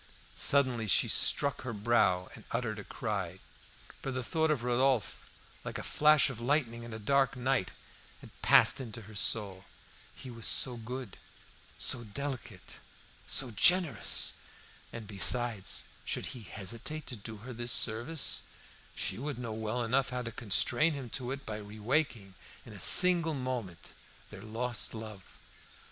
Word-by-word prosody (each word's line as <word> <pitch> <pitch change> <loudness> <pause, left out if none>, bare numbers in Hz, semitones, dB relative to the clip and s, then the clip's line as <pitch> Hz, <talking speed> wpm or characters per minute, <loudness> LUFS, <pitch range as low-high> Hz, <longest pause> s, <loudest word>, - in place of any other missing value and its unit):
Suddenly 130 -6 +1
she - - +3
struck 140 -1 +1
her 130 -2 -6
brow 100 -4 +1
and - - -10
uttered 115 -4 -3
a - - -8
cry; 100 -7 -5 0.6
for - - -5
the 130 -1 -4
thought 160 +5 0
of 145 -6 -1
Rodolphe, 125 -1 0 0.3
like - - -6
a - - -6
flash 150 0 +4
of 130 -4 -6
lightning 120 -3 -1
in 120 0 -9
a 110 - -6
dark 135 +5 +1
night, 125 -4 -1 0.5
had - - -14
passed - - +5
into 115 -2 -8
her 110 +2 -13
soul. 100 -2 0 0.5
He 130 - -10
was 115 -3 -2
so 125 -2 +4
good, 120 -1 -8 0.6
so 120 -2 +3
delicate, 130 +3 -7 0.5
so 130 -3 +1
generous! 175 - +2 0.6
And 115 -2 -8
besides, 110 0 +2 0.2
should - - -2
he 125 - -9
hesitate 115 +10 -5
to 125 - -6
do 110 +1 -9
her 130 - -7
this 120 +1 -3
service, 120 - +1 0.5
she - - -3
would 145 0 -5
know 120 -3 -6
well 110 +2 -3
enough 130 +4 0
how 125 0 -4
to 115 - -6
constrain 120 - +2
him 135 -5 -8
to 125 -1 -4
it 135 +1 -6
by 105 - -5
re 105 0 -11
waking, 115 -5 -2 0.3
in - - -12
a - - -9
single 170 -3 +8
moment, 125 -9 -5 0.4
their 100 -2 -11
lost 115 +1 0
love. 110 -3 -9
120 Hz, 155 wpm, -30 LUFS, 110-135 Hz, 0.6 s, single